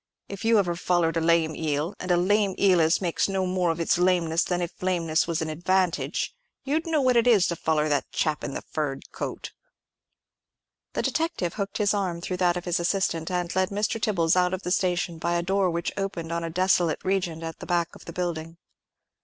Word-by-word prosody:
If 200 +1 -7
you 225 0 +4
ever 175 -4 +1
follered 170 -2 +1
a - - +1
lame 165 -1 +2
eel—and 160 +4 -3
a 175 - +4
lame 200 +2 +2
eel 185 -4 +4
as 160 +3 +3
makes 175 +1 0
no 190 -1 0
more 180 -1 0
of 165 0 -1
its 170 +1 +1
lameness 175 -2 +2
than 180 -1 -1
if 175 0 -5
lameness 170 -4 +1
was 165 -1 -1
a - - -4
advantage—you'd 185 - -1
know 315 -3 +2
what 255 -1 +3
it 235 +1 +4
is 210 -7 +5
to 170 - -1
foller 155 -1 0
that 145 -2 -1
chap 155 -2 -1
in 135 - -4
the - - -5
furred 145 -3 -4
coat." - - -5 1.4
The - - -1
detective 320 - -1
hooked 200 -2 -3
his 205 -1 +2
arm 185 -4 -1
through 180 +1 -4
that 180 -1 +2
of 175 - -6
his 175 -1 0
assistant, 170 -2 0
and 180 -1 -2
led 190 0 +2
Mr. 210 +2 -1
Tibbles 170 -7 +2
out 180 0 +2
of 185 - -10
the 180 - -3
station 180 -3 0
by 170 +1 0
a 170 - 0
door 190 +1 +1
which 170 0 -2
opened 190 -4 -4
on 170 0 -2
a 165 - -3
desolate 175 -1 +1
region 180 -4 -1
at 165 -1 -6
the - - -8
back 170 -1 +1
of - - -14
that - - -8
building. 165 -2 -3
175 Hz, 210 wpm, -26 LUFS, 165-190 Hz, 1.4 s, is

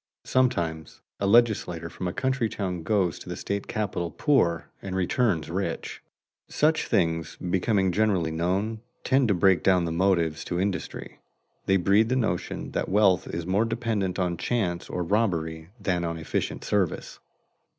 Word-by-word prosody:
Sometimes 85 - 0 0.2
a 100 - 0
legislator 100 -7 +3
from 90 +2 -5
a - - -1
country 130 +1 0
town 90 -5 -3
goes 90 0 0
to - - -10
the 90 - -3
state 100 +3 -3
capital 95 -5 -2
poor 85 - +1
and 95 -1 -5
returns 95 -2 +1
rich. 90 -2 -3 0.5
Such 155 +1 +2
things 80 - 0
becoming 95 +2 +1
generally 95 -4 +1
known 95 +7 -1 0.2
tend 130 -1 +3
to 100 - +2
break 95 0 +4
down 90 -2 +3
the 85 - -2
motives 85 -3 +1
to 90 - -2
industry. 95 0 -3 0.5
They 95 - +4
breed 100 +5 +3
the 130 - +1
notion 110 -9 -2
that - - -2
wealth 95 -2 +3
is 85 0 -4
more 95 +4 +2
dependent 115 -5 -1
on 90 -2 0
chance 90 -8 -1
or 90 -1 -2
jobbery 80 -6 0
than 90 -3 -1
on 85 -1 -2
efficient 80 - -3
service. 95 -5 -1
95 Hz, 155 wpm, -26 LUFS, 85-110 Hz, 0.5 s, break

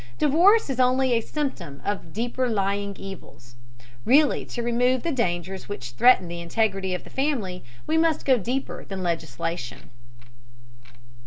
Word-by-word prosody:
Divorce 355 +10 +4
is 260 - -4
only 255 0 +3
a 230 - +2
symptom 220 - -4
of 195 -5 -3
deeper 240 +4 -1
lying 200 -1 -1
evils. 175 -10 -11 0.5
Really 285 +4 +4
to 240 - -5
remove 245 +2 +1
the 335 - -1
dangers 190 - -2
which 125 -12 -6
threaten 190 - +5
the 170 0 -6
integrity 190 +1 0
of 180 - -6
the - - -14
family 245 -11 -2 0.2
we 320 +1 +2
must 325 -2 +1
go 260 -3 +4
deeper 255 +7 -3
than 190 -1 -6
legislation. 160 -4 -4
215 Hz, 145 wpm, -25 LUFS, 180-260 Hz, 0.5 s, threaten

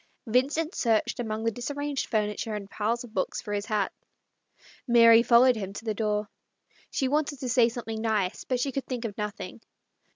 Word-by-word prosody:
Vincent 280 - +1
searched 225 -1 +1
among 220 -2 -3
the 230 - +1
disarranged 285 +4 -3
furniture 210 0 -1
and 205 -1 -5
the - - -19
piles 225 +4 -1
of 235 -3 -12
books 190 - -1
for 205 - -5
his 205 0 -2
hat. 210 -3 0 1.0
Mary 230 -1 +7
followed 245 +1 +5
him 195 -3 -5
to 225 - -8
the 220 - 0
door. 210 -1 -1 0.6
She 265 - 0
wanted 290 0 0
to 255 - -3
say 240 -1 +4
something 225 -2 -5
nice, 215 -5 0
but 255 -1 -1
she 275 +2 0
could 270 +1 -4
think 250 -2 -4
of 205 -3 -4
nothing. 210 0 -5
230 Hz, 190 wpm, -27 LUFS, 210-250 Hz, 1.0 s, Mary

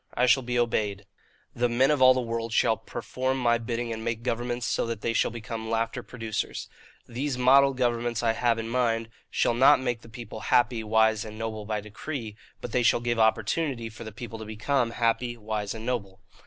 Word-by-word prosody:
I 125 - +3
shall 125 +2 +5
be 120 0 -2
obeyed. 105 -4 0 0.5
The 120 0 +1
men 130 +4 +3
of 145 -3 +1
all 130 0 +8
the 130 - +1
world 115 -1 -3
shall 115 0 +3
perform 130 +4 -3
my 120 -2 +2
bidding 115 0 -3
and 110 0 -6
make 115 0 -3
governments 120 0 -2
so 115 - 0
that 115 -2 -4
they 115 - 0
shall - - +2
become 110 -1 -6
laughter 115 +2 -1
producers. 115 -3 -4 0.4
These 130 +2 -3
modelled 135 +1 +5
governments 120 -2 0
I 115 -1 +3
have 115 0 +1
in 115 0 -4
mind 115 -2 0 0.2
shall - - +1
not 135 +5 +6
make 125 -3 -2
the 115 - -14
people 115 -1 -8
happy, 120 -2 +3
wise, 110 0 +3
and 110 0 -9
noble 110 -1 -4
by 105 -1 -1
decree; 110 +2 -6 0.3
but 120 - -6
they 125 - +2
shall 120 - +4
give 120 -1 -1
opportunity 115 +3 +1
for 110 +1 -10
the 110 - -7
people 115 +1 -8
to 110 - -7
become 115 +4 0
happy, 120 +1 0
wise, 105 -1 -3
and 110 0 -7
noble. 100 -7 -3
115 Hz, 205 wpm, -27 LUFS, 110-125 Hz, 0.5 s, all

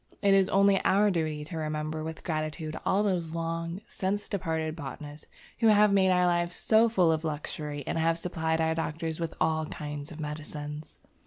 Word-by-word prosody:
It 200 -1 +5
is 195 -1 +4
only 195 0 +4
our 205 +2 +4
duty 155 -4 -1
to 160 +1 -5
remember 155 0 -3
with 160 0 -6
gratitude 155 -1 -3
all 200 +2 +3
those 175 -5 -1
long 165 +2 -3
since 200 0 -2
departed 160 -5 -2
botanists 145 0 -8 0.3
who 225 - +4
have 210 -1 +6
made 190 -1 +4
our 180 -1 +4
life 175 -1 +1
so 220 +5 +3
full 180 -7 +3
of 160 0 0
luxury 150 -1 -4
and 165 - -1
have 165 +1 +2
supplied 160 -2 -1
our 160 0 +2
doctors 160 0 -3
with 165 -1 -3
all 160 -1 +1
kinds 150 0 -6
of 160 - -9
medicines. 150 0 -6
160 Hz, 180 wpm, -29 LUFS, 155-185 Hz, 0.3 s, have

